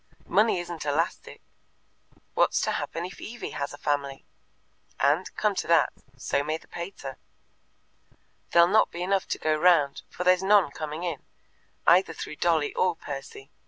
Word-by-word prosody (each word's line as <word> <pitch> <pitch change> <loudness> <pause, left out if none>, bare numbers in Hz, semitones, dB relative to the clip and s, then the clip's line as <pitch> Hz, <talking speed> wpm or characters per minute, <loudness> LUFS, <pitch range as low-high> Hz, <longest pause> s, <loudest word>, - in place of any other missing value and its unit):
Money 215 -3 +3
isn't 175 -2 -6
elastic. 150 +3 -2 0.9
What's - - +2
to - - 0
happen 170 - -3
if 185 - -10
Evie 240 +2 -6
has 140 - -4
a 145 - -9
family? 140 -2 -2 0.7
And, 150 +7 +2
come 210 -1 +1
to 185 - -3
that, 165 -3 +4 0.2
so 140 +2 -1
may 155 +2 -2
the - - -21
pater. 170 -7 -7 1.3
There'll 170 0 +6
not 215 +4 +4
be 175 - -5
enough 195 +1 0
to - - -2
go 155 0 +1
round, 155 -4 +3
for 180 - -5
there's 180 0 +4
none 195 -5 +4
coming 155 +2 -5
in, 165 -6 -3 0.6
either 175 -1 +5
through 155 - -7
Dolly 160 -4 +1
or 180 -2 +1
Percy. 135 -1 -8
170 Hz, 160 wpm, -27 LUFS, 145-180 Hz, 1.3 s, There'll